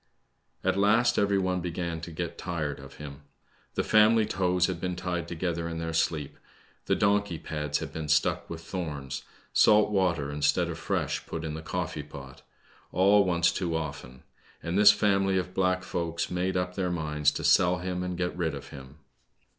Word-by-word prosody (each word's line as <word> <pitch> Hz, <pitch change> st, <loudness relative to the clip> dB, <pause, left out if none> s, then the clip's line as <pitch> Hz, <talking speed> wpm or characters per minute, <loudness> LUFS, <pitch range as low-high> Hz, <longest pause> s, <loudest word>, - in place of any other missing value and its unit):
At 95 Hz, +1 st, +1 dB
last 115 Hz, +4 st, +3 dB
every 100 Hz, -1 st, +2 dB
one 90 Hz, -1 st, 0 dB
began 85 Hz, -1 st, -3 dB
to 85 Hz, -, -7 dB
get 85 Hz, +1 st, -4 dB
tired 80 Hz, -5 st, -3 dB
of 70 Hz, -1 st, -12 dB
him. 70 Hz, -1 st, -9 dB, 0.5 s
The -, -, +1 dB
family 110 Hz, +1 st, +5 dB
toes 90 Hz, -2 st, +1 dB
had 90 Hz, -2 st, -3 dB
been 90 Hz, -1 st, -2 dB
tied 90 Hz, -2 st, -3 dB
together 85 Hz, -1 st, -2 dB
in 85 Hz, -, -5 dB
their 80 Hz, 0 st, -3 dB
sleep, 80 Hz, -3 st, -1 dB, 0.5 s
the -, -, +3 dB
donkey 100 Hz, -3 st, +1 dB
pads 75 Hz, -2 st, -3 dB
had -, -, -6 dB
been 80 Hz, -1 st, -4 dB
stuck 75 Hz, -1 st, +1 dB
with 80 Hz, -1 st, -6 dB
thorns, 75 Hz, -8 st, -5 dB, 0.3 s
salt 105 Hz, 0 st, +5 dB
water, 85 Hz, -8 st, +1 dB
instead 75 Hz, 0 st, +1 dB
of -, -, -5 dB
fresh, -, -, -2 dB
put 80 Hz, 0 st, -5 dB
in 80 Hz, -, -4 dB
the 80 Hz, -, -5 dB
coffee 85 Hz, -2 st, -3 dB
pot; 70 Hz, -3 st, -11 dB, 0.5 s
all 100 Hz, +3 st, +5 dB
once 85 Hz, -1 st, +2 dB
too 85 Hz, -3 st, -2 dB
often: 70 Hz, -5 st, -7 dB, 0.4 s
and 85 Hz, +1 st, -2 dB
this 105 Hz, +1 st, +8 dB
family 95 Hz, -2 st, +2 dB
of 90 Hz, 0 st, -3 dB
black 95 Hz, 0 st, +1 dB
folks 85 Hz, -2 st, -3 dB
made 90 Hz, +1 st, 0 dB
up 90 Hz, 0 st, -2 dB
their 90 Hz, -1 st, -1 dB
minds 75 Hz, -3 st, +1 dB
to -, -, -4 dB
sell 90 Hz, -1 st, +4 dB
him 90 Hz, 0 st, -3 dB
and 90 Hz, -1 st, -3 dB
get 90 Hz, 0 st, -2 dB
rid 80 Hz, -4 st, -1 dB
of 70 Hz, -, -9 dB
him. 65 Hz, +1 st, -11 dB
85 Hz, 185 wpm, -28 LUFS, 80-95 Hz, 0.5 s, this